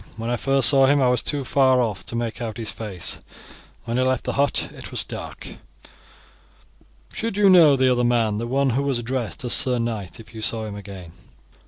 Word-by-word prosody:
"When 115 +1 -4
I - - +1
first 135 -1 +2
saw 135 0 +4
him 145 +1 +3
I 130 -2 +3
was 125 -1 +1
too 145 -3 -1
far 130 -1 +3
off 110 -6 -2
to - - -3
make 115 0 -4
out 110 -2 -5
his 115 -2 -3
face. 100 -6 -3 0.7
When 120 0 -3
he 130 - +2
left 130 0 0
the - - -3
hut 140 +1 0
it - - -10
was - - -2
dark." - - -9 1.6
"Should 225 -3 -4
you 200 -2 +5
know 165 -6 +6
the 130 -1 +2
other 125 -1 +1
man, 115 -3 +1
the 115 - -4
one 135 +2 +1
who 130 +4 0
was 140 -3 -1
addressed 120 -3 -4
as 120 - +5
sir 125 -1 +4
knight, 110 -7 -4
if 115 +1 -14
you 110 - -8
saw 110 0 +1
him 105 -1 -7
again?" 95 -4 -10
120 Hz, 215 wpm, -22 LUFS, 110-135 Hz, 1.6 s, know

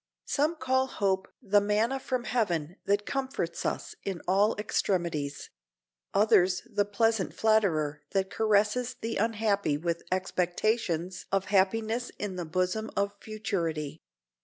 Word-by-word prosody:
Some 305 +4 +1
call 260 -2 +1
hope 190 -5 0 0.2
the 205 +1 +4
manna 215 +6 +1
from 255 -2 -2
heaven 180 -9 -1
that 205 +1 +1
comforts 265 -11 -2
us - - -3
in 190 -3 -3
all 200 +4 +3
extremities; 170 -8 -1 0.6
others 195 -3 +4
the 205 -4 0
pleasant 215 0 +1
flatterer 165 -10 +2
that 195 -1 0
caresses 220 +4 +2
the 225 -1 -3
unhappy 210 -7 +1
with 170 +2 -2
expectations 185 -1 0
of 195 -1 +1
happiness 225 +5 +2
in 205 -3 -4
the 175 -1 -3
bosom 185 +6 -1
of 200 0 +1
futurity. 170 -9 -3
200 Hz, 125 wpm, -29 LUFS, 180-225 Hz, 0.6 s, the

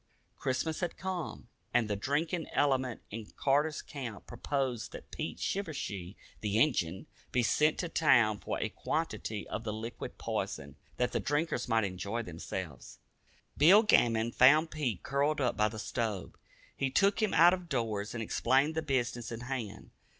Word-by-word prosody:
Christmas 135 +5 -1
had 175 -2 -3
come, 185 -3 -4 0.3
and 115 - +4
the 105 - -1
drinking 155 - -1
element 130 -4 +1
in 110 0 -6
Carter's 145 +2 +1
Camp 120 -8 -7
proposed 125 -1 -2
that - - -10
Pete - - -4
Shivershee 105 - -3 0.2
the 105 0 -1
"Injun" 95 - +1 0.3
be 125 - +2
sent 150 +6 +3
to 175 - -2
town 120 -10 +4
for - - -3
a - - -1
quantity 150 -9 -3
of 110 - -4
the 110 - -2
liquid 110 +2 -6
poison, 70 -1 -3 0.2
that 125 0 +1
the - - 0
drinkers 145 -3 -1
might 115 -1 +3
"enjoy" 100 +4 -3
themselves. 85 - -7 0.6
Bill 185 +9 +7
Gammon 115 - +3
found 150 +7 +6
Pete 125 - -2
curled 145 +2 +1
up 125 -3 +1
by 105 - +3
the 110 - -8
stove. 110 -2 -3 0.4
He 135 - 0
took 200 +9 +3
him 215 - +1
out 170 +3 +8
of 180 -2 -4
doors 115 -5 -2
and 115 - -2
explained 135 +7 +2
the 160 - -1
business 125 -5 -1
in 115 0 -5
hand. 120 -5 -5
125 Hz, 160 wpm, -31 LUFS, 110-155 Hz, 0.6 s, out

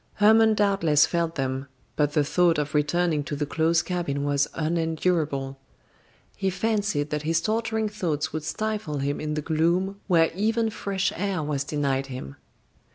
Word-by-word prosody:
Hermon 220 +1 +5
doubtless 195 -8 +3
felt 170 -1 -1
them, 135 0 -2 0.3
but 145 -1 +1
the 150 - +3
thought 170 +3 +2
of 150 +1 -2
returning 155 +1 +1
to 145 - -4
the 145 +1 -1
close 165 +3 +1
cabin 165 -6 -2
was 145 0 +1
unendurable. 160 -4 -1 0.8
He 195 -1 -1
fancied 205 -7 -1
that 150 0 -1
his 165 +2 +1
torturing 220 +3 -1
thoughts 175 -10 -2
would 155 -1 -3
stifle 205 -1 -3
him 140 +1 -2
in 150 0 -2
the 150 - -2
gloom 175 +5 0
where 165 -4 +4
even 220 +4 0
fresh 195 -2 -2
air 190 -3 -1
was 145 -2 -1
denied 140 -2 -1
him. 125 - -7
165 Hz, 160 wpm, -25 LUFS, 145-195 Hz, 0.8 s, Hermon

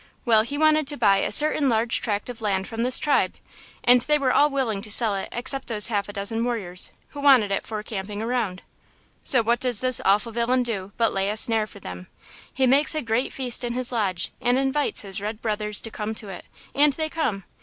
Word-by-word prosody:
Well, 225 -3 +4
he 280 +6 -5
wanted 310 -1 +3
to 290 0 -3
buy 200 -4 +3
a - - -1
certain 300 -2 +4
large 230 0 0
tract 205 -3 -3
of 245 -2 -9
land 195 -3 -1
from 225 0 -5
this 250 +1 +5
tribe, 295 -2 +1 0.5
and 245 0 +5
they 300 +3 +1
were 270 -3 0
all 295 +1 +4
willing 250 -8 -2
to 215 - -10
sell 220 0 +6
it 195 - -4
except 260 +3 -1
those 215 -2 +2
half 205 -2 -2
a - - -8
dozen 220 +3 -3
warriors, 200 -7 -2 0.2
who 290 - -10
wanted 265 -8 +4
it 195 - -2
for 215 -1 -5
camping 205 -1 -6
ground. 220 -4 -3 0.6
So 255 -6 +3
what 235 +2 +1
does 250 -4 0
this 255 -1 +1
awful 210 +4 +2
villain 240 +2 0
do 200 -5 -4
but 230 -1 +1
lay 195 0 -1
a 210 - -3
snare 220 -1 +2
for 200 - -14
them. 90 - -9 0.4
He 265 - 0
makes 280 +5 +3
a 310 - -2
great 235 +3 -1
feast 250 -2 0
in 240 -1 -3
his 250 0 0
lodge 195 -7 -1
and 245 0 +1
invites 270 +2 0
his 195 -1 -7
red 210 +1 -5
brothers 210 -1 -1
to 225 - -7
come 215 +1 -5
to 210 -2 -8
it; 185 - -9 0.3
and 290 0 +3
they 315 +1 -3
come. 260 -12 -3
230 Hz, 230 wpm, -23 LUFS, 210-260 Hz, 0.6 s, sell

